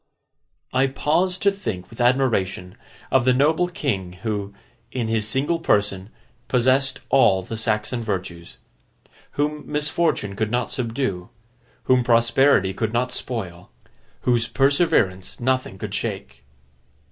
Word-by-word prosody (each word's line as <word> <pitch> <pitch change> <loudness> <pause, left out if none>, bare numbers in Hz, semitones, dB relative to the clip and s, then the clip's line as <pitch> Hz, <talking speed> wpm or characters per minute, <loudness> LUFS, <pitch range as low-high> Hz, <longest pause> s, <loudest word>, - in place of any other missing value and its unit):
I 130 +1 +3
pause 165 +7 0
to 200 +2 +2
think 110 - -5
with 115 - -6
admiration, 110 -8 +1 0.4
of 130 - +4
the 130 +1 +4
noble 155 +6 +3
king 100 - -3
who, 105 -3 -2 0.4
in 120 -3 -2
his 110 -1 0
single 140 +9 0
person, 100 - 0 0.4
possessed 130 +2 +2
all 95 -8 +4
the 115 - -6
Saxon 110 +2 -1
virtues. 90 -6 -5 0.8
Whom 150 +1 -1
misfortune 150 -8 0
could 110 0 -1
not 120 +1 -1
subdue, 115 -7 -3 0.5
whom 130 -1 +3
prosperity 115 -3 +3
could 110 +3 -2
not 125 +1 0
spoil, 95 -9 -5 0.5
whose 120 -2 +2
perseverance 135 - +1
nothing 130 -5 -1
could - - -6
shake. - - -4
120 Hz, 125 wpm, -22 LUFS, 100-135 Hz, 0.8 s, of